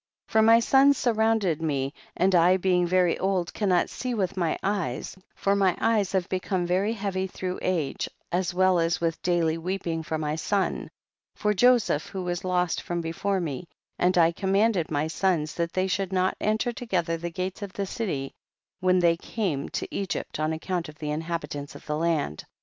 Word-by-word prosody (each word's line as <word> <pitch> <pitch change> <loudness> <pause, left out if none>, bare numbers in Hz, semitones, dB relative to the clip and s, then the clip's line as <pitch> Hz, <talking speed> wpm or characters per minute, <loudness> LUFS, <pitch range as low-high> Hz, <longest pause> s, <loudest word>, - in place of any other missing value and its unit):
31. - - -21
For 220 0 +5
my 230 0 +8
sons 270 +3 +5
surrounded 220 - +1
me 140 -3 -1 0.2
and 185 +2 +3
I 180 +1 +5
being 180 -1 +2
very 180 -1 +2
old 185 -2 0
cannot 185 -4 +2
see 250 -2 -4
with 190 -4 -1
my 170 -4 0
eyes, 185 -10 -2 0.2
for 200 0 +1
my 195 -3 +3
eves 210 -4 +1
have 190 -1 +1
become 185 -1 -1
very 190 +5 +1
heavy 195 -3 -2
through 185 0 -4
age, 170 -7 -1 0.2
as 180 +1 0
well 185 0 +3
as 165 0 +1
with 165 -1 -1
daily 165 -2 +1
weeping 170 -2 -2
for 160 0 -3
my 150 -1 -2
son, 195 +4 -1 0.5
for 210 0 +1
Joseph 235 -7 +3
who 190 -1 -5
was 175 -1 -3
lost 180 -2 0
from 175 0 -3
before 170 +4 -1
me, 165 -1 -4 0.3
and 180 0 +3
I 165 -1 +5
commanded 195 0 +1
my 150 0 0
sons 160 -2 0
that 170 -1 -2
they 185 0 +1
should 190 0 -1
not 185 0 +1
enter 215 +3 +1
together 180 -9 -1
the 170 +1 -4
gates 185 +3 -4
of 200 -2 -6
the 200 - -2
city 175 -10 -3 0.5
when 185 0 +3
they 170 -2 +4
came 170 -9 -3
to - - -4
Egypt, 195 -5 -3
on 155 +1 0
account 165 +1 -3
of 150 - -13
the 150 -1 -4
inhabitants 150 -2 -4
of - - -12
the 150 - -2
land, 155 - 0
32. - - -9
180 Hz, 190 wpm, -26 LUFS, 165-195 Hz, 0.5 s, my